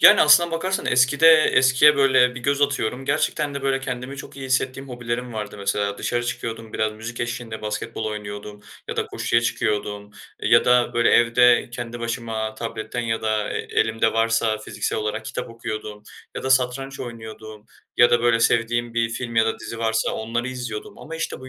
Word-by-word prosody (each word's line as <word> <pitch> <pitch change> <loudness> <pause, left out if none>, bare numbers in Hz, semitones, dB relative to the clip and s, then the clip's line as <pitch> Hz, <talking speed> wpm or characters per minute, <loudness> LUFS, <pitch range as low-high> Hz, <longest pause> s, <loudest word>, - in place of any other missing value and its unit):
Yani 195 +5 +8
aslına 155 +3 +6
bakarsan 185 +4 -2
eskide 130 +6 +4 0.2
eskiye 130 +3 +5
böyle 130 -2 +4
bir 125 - -7
göz 140 +2 0
atıyorum. 135 -2 -1
Gerçekten 145 0 0
deü 140 - -5
böyleü 135 0 0
kendimi 125 +1 -5
çok 140 - -10
iyi 135 -1 -6
hissettiğim 130 +1 -1
hobilerim 120 0 -4
vardı 105 -1 -5
mesela 100 0 -1
dışarı 120 0 -1
çıkıyordum. 115 -2 -5
Biraz 110 0 -1
müzik 115 +2 -7
eşliğinde 115 -2 -5
basketbol 110 +1 -4
oynuyordum 105 -1 -6 0.3
ya - - -4
da - - -1
koşuya 115 - 0
çıkıyordum 105 -2 -2 0.3
ya - - +5
da, 125 0 +3
böyle, 120 0 +3
evde 120 +1 +4
kendi 120 0 -6
başıma 115 -2 -3
tabletten 115 +1 -5
ya 115 -1 -2
da 110 -1 -1
e - - -2
elimde 110 0 0
varsa 115 -1 +1
fiziksel 110 - -3
olarak 110 +1 -3
kitap 125 - -5
okuyordum 110 -2 -6 0.3
ya - - -4
da 130 - -2
satranç 130 +1 +1
oynuyordum 110 -2 -9 0.3
ya 120 0 +6
da, 120 0 +3
böyle, 115 -1 +3
sevdiğim 120 +1 +1
bir 115 -1 +1
film 115 -1 -5
ya 110 0 +4
da - - -2
dizi 115 - -7
varsa 110 0 0
onları 120 +3 -3
izliyordum 120 -4 -6
ama 165 +1 -8
işte 165 - -4
bu 130 - -10
120 Hz, 180 wpm, -22 LUFS, 110-130 Hz, 0.3 s, Yani